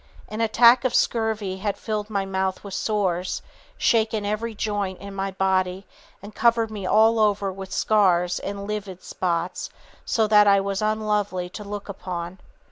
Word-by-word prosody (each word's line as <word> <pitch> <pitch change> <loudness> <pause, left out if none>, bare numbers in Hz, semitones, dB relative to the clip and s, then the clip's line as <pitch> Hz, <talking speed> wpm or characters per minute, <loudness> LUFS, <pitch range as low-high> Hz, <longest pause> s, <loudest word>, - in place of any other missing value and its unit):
An 215 +1 -4
attack 235 +2 +5
of 255 -2 0
scurvy 220 -4 0
had 200 +1 -2
filled 215 -1 -3
my 200 -2 -1
mouth 190 -1 -2
with 200 -2 -8
sores, 190 -5 -1 0.3
shaken 220 -2 +1
every 215 +2 -2
joint 205 -3 -2
in 200 0 -9
my 195 0 -2
body 190 0 0 0.4
and 205 +1 -10
covered 230 0 +2
me 200 -3 -5
all 225 +2 +4
over 205 -2 +1
with 190 0 -9
scars 180 -5 +2
and 200 0 -5
livid 200 -3 -5
spots, 175 -1 -2 0.3
so 225 -3 +1
that 210 -1 +5
I 200 0 +6
was 195 0 -2
unlovely 210 -4 -1
to 210 - -8
look 205 0 -6
upon. 180 -2 -6
200 Hz, 160 wpm, -24 LUFS, 190-215 Hz, 0.4 s, I